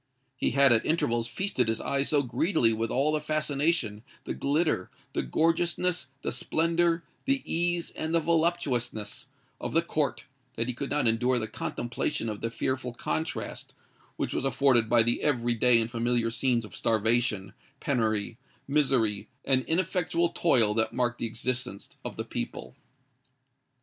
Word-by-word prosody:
He -, -, +1 dB
had 140 Hz, -2 st, +6 dB
at 110 Hz, -, +3 dB
intervals 120 Hz, -8 st, +1 dB
feasted 160 Hz, -, -1 dB
his 115 Hz, 0 st, 0 dB
eyes 140 Hz, 0 st, 0 dB
so 145 Hz, -2 st, +3 dB
greedily 125 Hz, -, +2 dB
with 115 Hz, +1 st, -2 dB
all 140 Hz, +4 st, +2 dB
the 155 Hz, -, +1 dB
fascination, 150 Hz, -6 st, 0 dB, 0.2 s
the -, -, -4 dB
glitter, 145 Hz, -, 0 dB, 0.2 s
the -, -, 0 dB
gorgeousness, 165 Hz, -, +1 dB, 0.2 s
the -, -, -1 dB
splendour, 165 Hz, +1 st, +1 dB, 0.2 s
the 275 Hz, 0 st, +1 dB
ease, 175 Hz, 0 st, 0 dB
and 160 Hz, -, -4 dB
the 170 Hz, -, +3 dB
voluptuousness, 150 Hz, -11 st, -1 dB, 0.3 s
of -, -, -4 dB
the 165 Hz, +1 st, +3 dB
Court, 150 Hz, -5 st, -1 dB, 0.3 s
that 115 Hz, -, -1 dB
he 125 Hz, -, -1 dB
could 135 Hz, +3 st, -5 dB
not 145 Hz, -2 st, 0 dB
endure 125 Hz, +3 st, +2 dB
the 110 Hz, -, -1 dB
contemplation 120 Hz, +3 st, -3 dB
of 105 Hz, -1 st, -5 dB
the 115 Hz, -, -1 dB
fearful 125 Hz, +1 st, -3 dB
contrast 160 Hz, +6 st, -4 dB, 0.4 s
which -, -, -2 dB
was -, -, -1 dB
afforded 130 Hz, -3 st, +3 dB
by 120 Hz, -1 st, +6 dB
the 120 Hz, +1 st, +1 dB
every 120 Hz, -5 st, +1 dB
day 120 Hz, +1 st, +4 dB
and 115 Hz, +1 st, -2 dB
familiar 120 Hz, -1 st, 0 dB
scenes 120 Hz, -1 st, +1 dB
of -, -, -11 dB
starvation, 110 Hz, -3 st, +1 dB, 0.3 s
penury, 110 Hz, -4 st, -1 dB, 0.3 s
misery, 125 Hz, -8 st, +1 dB, 0.2 s
and 130 Hz, -1 st, +2 dB
ineffectual 175 Hz, 0 st, +1 dB
toil 120 Hz, -13 st, +3 dB
that 110 Hz, 0 st, 0 dB
marked 120 Hz, -1 st, 0 dB
the 115 Hz, -, -1 dB
existence 120 Hz, -1 st, -4 dB
of -, -, -6 dB
the -, -, -4 dB
people. -, -, -5 dB
130 Hz, 155 wpm, -28 LUFS, 115-155 Hz, 0.4 s, had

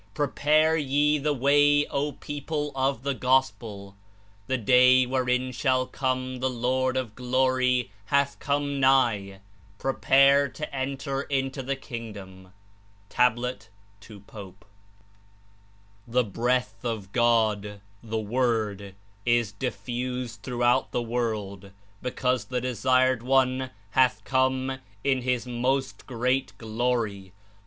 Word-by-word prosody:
Prepare 155 Hz, +2 st, +2 dB
ye 145 Hz, +1 st, +2 dB
the 150 Hz, +2 st, 0 dB
way, 145 Hz, +2 st, +4 dB
O 145 Hz, +1 st, -2 dB
people 145 Hz, 0 st, -4 dB
of 135 Hz, -1 st, -1 dB
the 140 Hz, 0 st, 0 dB
Gospel! 120 Hz, -7 st, -1 dB, 0.5 s
The 130 Hz, -, 0 dB
day 125 Hz, +2 st, +5 dB
wherein 130 Hz, 0 st, 0 dB
shall 130 Hz, 0 st, +1 dB
come 130 Hz, -1 st, -2 dB
the 130 Hz, +1 st, 0 dB
Lord 130 Hz, +1 st, 0 dB
of 125 Hz, -5 st, -3 dB
Glory 125 Hz, -1 st, +1 dB
hath 140 Hz, +4 st, +1 dB
come 145 Hz, -1 st, -1 dB
nigh; 115 Hz, -8 st, +2 dB, 0.4 s
prepare 135 Hz, +2 st, +4 dB
to 150 Hz, +1 st, -7 dB
enter 135 Hz, +1 st, -3 dB
into 135 Hz, -1 st, -2 dB
the 135 Hz, +2 st, -2 dB
Kingdom.' 100 Hz, -8 st, -9 dB, 0.3 s
" 100 Hz, 0 st, -33 dB
(Tab. 125 Hz, -1 st, +3 dB, 0.6 s
to 100 Hz, +1 st, -13 dB
Pope) 100 Hz, -1 st, -12 dB, 1.4 s
"The 125 Hz, +2 st, +2 dB
breath 125 Hz, +4 st, -1 dB
of 110 Hz, -5 st, -4 dB
God 110 Hz, -4 st, +1 dB, 0.2 s
(The 110 Hz, -1 st, -3 dB
Word) 110 Hz, -4 st, -1 dB, 0.3 s
is 120 Hz, -3 st, +2 dB
diffused 120 Hz, +2 st, -4 dB
throughout 125 Hz, 0 st, +1 dB
the 120 Hz, -, -1 dB
world, 110 Hz, -5 st, -3 dB, 0.3 s
because 125 Hz, -2 st, -1 dB
the 125 Hz, +4 st, -2 dB
Desired 130 Hz, 0 st, +2 dB
One 130 Hz, 0 st, +1 dB, 0.2 s
hath 130 Hz, -1 st, +2 dB
come 130 Hz, 0 st, 0 dB, 0.2 s
in 135 Hz, -2 st, +1 dB
His 125 Hz, -1 st, -1 dB
Most 125 Hz, +2 st, -2 dB
Great 125 Hz, +2 st, -1 dB
Glory. 110 Hz, -4 st, -2 dB
125 Hz, 115 wpm, -26 LUFS, 115-135 Hz, 1.4 s, day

